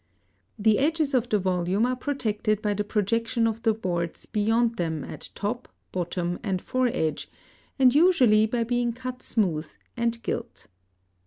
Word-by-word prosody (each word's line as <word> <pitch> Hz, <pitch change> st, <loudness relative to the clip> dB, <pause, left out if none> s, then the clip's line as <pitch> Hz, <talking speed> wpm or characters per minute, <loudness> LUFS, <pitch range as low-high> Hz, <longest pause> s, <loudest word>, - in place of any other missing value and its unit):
The 215 Hz, 0 st, +3 dB
edges 305 Hz, 0 st, +1 dB
of 245 Hz, -2 st, +1 dB
the 210 Hz, -, +3 dB
volume 185 Hz, +2 st, +1 dB
are 255 Hz, +1 st, 0 dB
protected 220 Hz, -6 st, -1 dB
by 210 Hz, -1 st, +1 dB
the 210 Hz, +1 st, -1 dB
projection 230 Hz, +3 st, 0 dB
of 225 Hz, 0 st, -1 dB
the 225 Hz, -, +3 dB
boards 175 Hz, -6 st, -3 dB
beyond 225 Hz, +2 st, +1 dB
them 160 Hz, -5 st, -2 dB
at -, -, -8 dB
top, 230 Hz, +5 st, -3 dB, 0.2 s
bottom, 175 Hz, 0 st, -2 dB
and 190 Hz, -3 st, -1 dB
fore 255 Hz, +5 st, 0 dB
edge, 155 Hz, -6 st, -2 dB, 0.5 s
and 255 Hz, -3 st, +5 dB
usually 255 Hz, -10 st, +5 dB
by 235 Hz, +1 st, 0 dB
being 240 Hz, 0 st, 0 dB
cut 255 Hz, +1 st, -6 dB
smooth 170 Hz, -8 st, 0 dB, 0.3 s
and 235 Hz, -1 st, 0 dB
gilt. -, -, -4 dB
225 Hz, 155 wpm, -26 LUFS, 190-245 Hz, 0.5 s, and